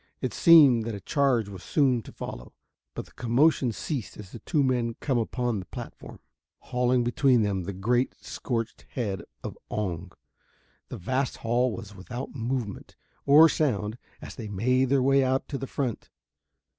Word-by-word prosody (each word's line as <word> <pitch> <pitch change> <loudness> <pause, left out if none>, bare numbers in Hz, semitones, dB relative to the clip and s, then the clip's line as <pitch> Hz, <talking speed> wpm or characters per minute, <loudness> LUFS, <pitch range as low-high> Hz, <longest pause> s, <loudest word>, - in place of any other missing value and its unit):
It - - -3
seemed 140 -9 +7
that 115 -2 -3
a - - -6
charge 125 - +1
was 95 -3 -9
soon 130 -3 +2
to - - -12
follow, - - -8 0.4
but - - -5
the - - -20
commotion 125 +2 +2
ceased 125 +1 -5
as 100 -3 -10
the 115 - -9
two 150 +2 0
men 120 -3 0
come 130 -4 0
upon 120 -1 -1
the 90 - -9
platform, - - -9 0.4
hauling 125 0 0
between 120 0 +3
them 95 -3 -1
the 100 - -3
great 120 +7 0
scorched 115 -3 -4
head 105 -7 -2 0.2
of - - -5
"Oong." 90 -4 -3 0.8
The - - -6
vast 130 +8 -2
hall 120 +2 +2
was 110 -2 -8
without 120 +7 -7
movement 120 -4 -4 0.3
or 150 +3 +8
sound 115 -8 -1 0.2
as - - -8
they 110 - -7
made 125 +6 +2
their 135 0 +2
way 135 +1 +4
out 130 +1 0
to 140 - -3
the 135 - -5
front. 125 -6 -3
120 Hz, 170 wpm, -27 LUFS, 105-135 Hz, 0.8 s, or